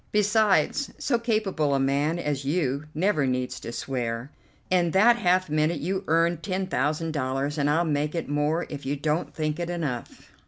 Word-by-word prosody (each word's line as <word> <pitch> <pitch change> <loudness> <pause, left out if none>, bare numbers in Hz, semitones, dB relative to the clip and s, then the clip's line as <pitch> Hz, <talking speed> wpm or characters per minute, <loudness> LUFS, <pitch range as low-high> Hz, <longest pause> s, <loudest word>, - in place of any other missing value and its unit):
Besides, 210 - +2
so 240 -4 0
capable 200 - 0
a - - +1
man 140 +4 +1
as 145 -5 -2
you 140 -1 -1
never 160 -4 +2
needs 125 0 -2
to - - -7
swear. 120 0 -3 0.4
In 175 -2 +3
that 220 +7 +5
half 185 -4 +2
minute 155 +1 +1
you 190 +6 -2
earned 165 +1 +2
ten 190 0 -2
thousand 155 0 -1
dollars, 135 0 -1
and 145 0 +2
I'll 165 +3 +2
make 150 0 -1
it 165 - -2
more 150 +4 0
if 145 -1 -7
you 135 +2 -1
don't 150 +3 -1
think 155 0 -2
it 170 0 -3
enough." 150 -9 -5
155 Hz, 175 wpm, -26 LUFS, 140-180 Hz, 0.4 s, that